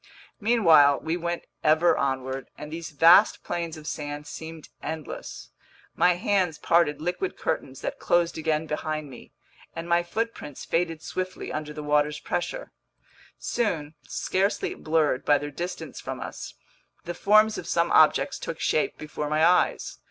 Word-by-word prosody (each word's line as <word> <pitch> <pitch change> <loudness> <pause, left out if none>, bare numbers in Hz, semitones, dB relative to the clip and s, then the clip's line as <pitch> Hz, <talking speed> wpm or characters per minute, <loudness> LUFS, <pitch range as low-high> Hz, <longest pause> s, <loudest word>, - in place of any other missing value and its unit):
Meanwhile 165 - +5
we 160 +1 -1
went 175 0 -3 0.2
ever 160 +3 +4
onward, 130 -1 -2
and 150 0 -8
these 165 0 -5
vast 170 +7 +6
plains 170 -2 -3
of 155 - -11
sand 145 -1 -5
seemed 160 +1 -9
endless. 160 -2 -7 0.4
My 180 - +4
hands 180 -3 0
parted 165 -4 +2
liquid 180 - -3
curtains - - -3
that - - -4
closed 175 -1 +2
again 155 0 0
behind 155 -1 -3
me, 120 - -13 0.4
and 165 +1 -5
my 170 0 +3
footprints 195 - -4
faded 165 -2 -1
swiftly 185 0 -4
under 150 0 -4
the 150 0 -7
water's 150 0 +1
pressure. - - -3 0.7
Soon, 165 -11 -2
scarcely 195 +2 -1
blurred 155 -4 0
by 145 - +4
their 145 0 -5
distance 175 +5 -6
from - - -5
us, - - -7 0.5
the 175 - -4
forms 215 +4 +4
of 170 - -8
some 170 0 +1
objects 155 - +4
took 165 - -5
shape 155 - 0
before 150 -1 -5
my 155 +1 +3
eyes. 180 +1 +2
160 Hz, 150 wpm, -26 LUFS, 150-175 Hz, 0.7 s, vast